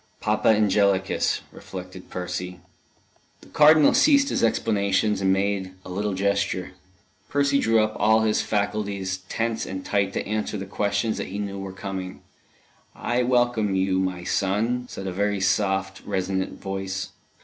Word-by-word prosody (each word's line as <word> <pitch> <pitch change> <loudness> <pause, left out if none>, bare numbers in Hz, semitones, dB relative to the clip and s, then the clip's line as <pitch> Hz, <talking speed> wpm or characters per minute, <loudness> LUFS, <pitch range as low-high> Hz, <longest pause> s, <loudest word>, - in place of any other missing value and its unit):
Papa 105 +1 +1
Angelicus! 100 -3 +2
reflected 90 0 -9
Percy. 90 0 -5 0.8
The - - -17
Cardinal 155 0 +6
ceased 285 +1 +5
his - - -1
explanations, 105 -2 +1
and 95 0 +3
made 95 -1 -1
a - - -9
little 100 +1 -2
gesture. 100 -1 0 0.6
Percy 140 -1 +2
drew 115 -2 +3
up 110 0 -1
all 110 +1 +4
his 110 -1 +2
faculties 100 -2 -2
tense 115 0 -1
and 95 -1 -6
tight 100 -1 +1
to - - -3
answer 105 0 -2
the 95 - -5
questions 100 +2 -1
that - - -3
he 100 - -6
knew 100 -1 -4
were 95 0 -6
coming. 95 -1 -6 0.7
"I 120 +1 0
welcome 120 -5 +2
you, 95 0 +1
my 95 -2 -2
son," 110 +7 0
said 95 - -7
a 95 - -3
very 100 +1 0
soft, 95 0 0
resonant 95 -1 -2
voice. 95 0 -4
100 Hz, 150 wpm, -24 LUFS, 95-110 Hz, 0.8 s, Cardinal